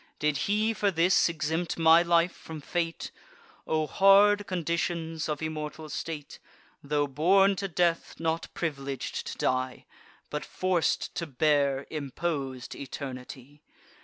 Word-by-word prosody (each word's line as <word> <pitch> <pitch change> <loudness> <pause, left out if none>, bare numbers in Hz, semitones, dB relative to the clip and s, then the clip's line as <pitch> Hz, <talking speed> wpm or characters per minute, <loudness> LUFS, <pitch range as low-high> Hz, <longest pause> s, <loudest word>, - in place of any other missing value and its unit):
Did 150 -1 0
he 215 +2 +2
for 205 -2 +1
this 180 0 +3
exempt 160 +1 -2
my 165 0 +6
life 170 0 +3
from 160 -2 -9
fate? 165 +2 -3 0.6
O 155 -1 +1
hard 200 +3 +5
conditions 170 -2 -2
of 150 +1 -3
immortal 155 0 -5
state, 150 -1 -6 0.4
Tho' 145 0 0
born 190 +8 +4
to 195 - -2
death, 170 -1 0
not 165 0 -1
privileg'd 140 -5 -4
to - - -6
die, 130 0 -1 0.5
But 150 - -3
forc'd 185 -3 0
to 170 - -3
bear 140 -1 +1
impos'd 140 -3 -3
eternity! 135 +1 -8
160 Hz, 125 wpm, -28 LUFS, 145-175 Hz, 0.6 s, my